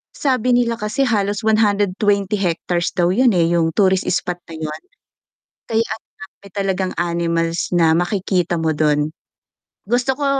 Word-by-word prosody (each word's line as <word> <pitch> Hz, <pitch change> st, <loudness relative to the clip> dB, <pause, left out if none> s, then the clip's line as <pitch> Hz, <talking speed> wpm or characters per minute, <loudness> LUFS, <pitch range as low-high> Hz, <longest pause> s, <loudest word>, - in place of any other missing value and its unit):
sabi 255 Hz, -3 st, +1 dB
nila 235 Hz, -1 st, +1 dB
kasi 215 Hz, +6 st, -1 dB
halos 205 Hz, -3 st, 0 dB
120 205 Hz, -1 st, +1 dB
hectares 175 Hz, -1 st, -1 dB
daw 175 Hz, 0 st, +2 dB
yun 245 Hz, +4 st, +4 dB
eh, 170 Hz, -1 st, +2 dB
yung 165 Hz, -1 st, +2 dB
tourist 190 Hz, -2 st, +2 dB
spot 180 Hz, -1 st, -1 dB
na 165 Hz, -, -9 dB
yun. 155 Hz, -1 st, -5 dB, 0.9 s
Kaya 225 Hz, 0 st, +1 dB
ang -, -, -6 dB, 0.4 s
dami -, -, -15 dB
talagang 190 Hz, -2 st, -1 dB
animals 170 Hz, -1 st, -1 dB
na 165 Hz, -2 st, +4 dB
makikita 180 Hz, -1 st, 0 dB
mo 160 Hz, -1 st, +1 dB
dun. 150 Hz, 0 st, +1 dB, 0.8 s
Gusto 245 Hz, +4 st, +1 dB
ko 290 Hz, -, -2 dB
190 Hz, 145 wpm, -19 LUFS, 170-215 Hz, 0.9 s, yun